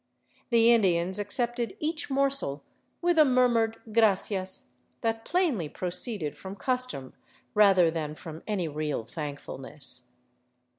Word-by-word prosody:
The 235 -1 +6
Indians 185 -3 +2
accepted 240 +3 -2
each 310 0 -2
morsel 275 - +1 0.4
with 350 -2 +3
a - - +9
murmured 245 -4 +2
" 220 - -12
Gracias 195 -3 +1 0.2
" - - -43
that 225 0 -1
plainly 300 - 0
proceeded 180 -2 -2
from 190 +1 -8
custom 250 - 0 0.4
rather 195 -5 +5
than 155 -2 -4
from 160 -1 -9
any 195 -6 -1
real 150 -4 -3
thankfulness. 140 -3 -5
205 Hz, 120 wpm, -28 LUFS, 160-240 Hz, 0.4 s, a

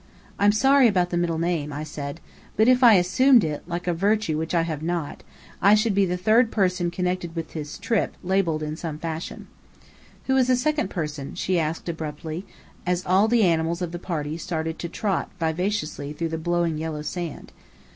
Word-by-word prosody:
"I'm 205 +1 +5
sorry 270 +4 +5
about 180 -4 +1
the - - -1
middle 170 -2 0
name," 165 -3 -1
I 145 +2 -4
said. 145 0 -6 0.4
"But 220 +2 +4
if 255 0 +5
I 230 -3 +9
assumed 225 +7 +5
it 150 -2 -2
like 175 0 -4
a 175 - +1
virtue 200 -1 +1
which 160 +3 -2
I 165 - +3
have 160 -3 -4
not 170 -2 -3 0.4
I 200 +2 +6
should 215 0 +2
be 195 0 +3
the 180 0 -1
third 220 +6 +4
person 180 -5 +1
connected 180 -1 -2
with 165 -1 -5
this 150 -2 -6
trip, 225 0 -1
labelled 180 -4 +1
the 155 0 -3
same 160 -2 -5
fashion." 165 +1 -5 0.8
"Who 265 - +1
is 255 -2 +3
the 255 - +4
second 300 +4 0
person?" 150 -5 -5
she 180 0 0
asked 160 +2 -3
abruptly, 160 +1 -5 0.4
as 180 0 -1
all 190 +4 +4
the 235 -1 +3
animals 170 0 +1
of 170 - -3
the 175 - -5
party 160 -3 -4
started 160 -1 -3
to 170 - -4
trot 195 +1 -2
vivaciously 160 -3 -2
through 165 +2 -3
the 160 0 -3
blowing 170 -1 0
yellow 155 -1 -4
sand. 170 0 -5
175 Hz, 195 wpm, -24 LUFS, 160-200 Hz, 0.8 s, I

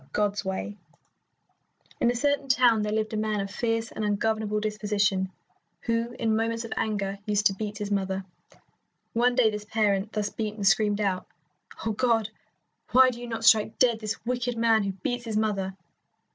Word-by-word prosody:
XL 135 - -23
GOD'S 205 -1 0
WAY 190 +2 -4 1.2
In 235 - +3
a 245 - 0
certain 285 +2 0
town 245 -4 +4
there 210 0 -1
lived 215 0 -1
a - - -1
man 215 -1 0
of 195 0 -3
fierce 225 -1 -1
and 220 - -4
ungovernable 215 0 0
disposition, 205 -3 0 0.5
who 230 +1 -1
in 220 -1 +1
moments 230 +1 -1
of 230 - -4
anger 200 -2 -2
used 205 0 +1
to 195 - +5
beat 205 +1 -5
his 205 -1 -4
mother. 190 -1 -1 0.9
One 245 +1 +3
day 235 -4 +4
this 210 0 -5
parent, 210 -1 +1
thus 210 -1 -2
beaten, 215 -1 -4
screamed 205 +1 +3
out, 185 -3 -1 0.6
"Oh, 225 - +1
God, 225 -1 +1 0.6
why 255 0 +7
do 240 0 -9
you 245 - -6
not 225 -1 -4
strike 220 -1 +5
dead 235 -3 +3
this 215 +1 -5
wicked 245 0 -1
man 225 -1 +4
who 200 -1 -2
beats 240 +6 -3
his 220 -2 -2
mother?" 195 -3 -1
215 Hz, 180 wpm, -27 LUFS, 205-230 Hz, 1.2 s, why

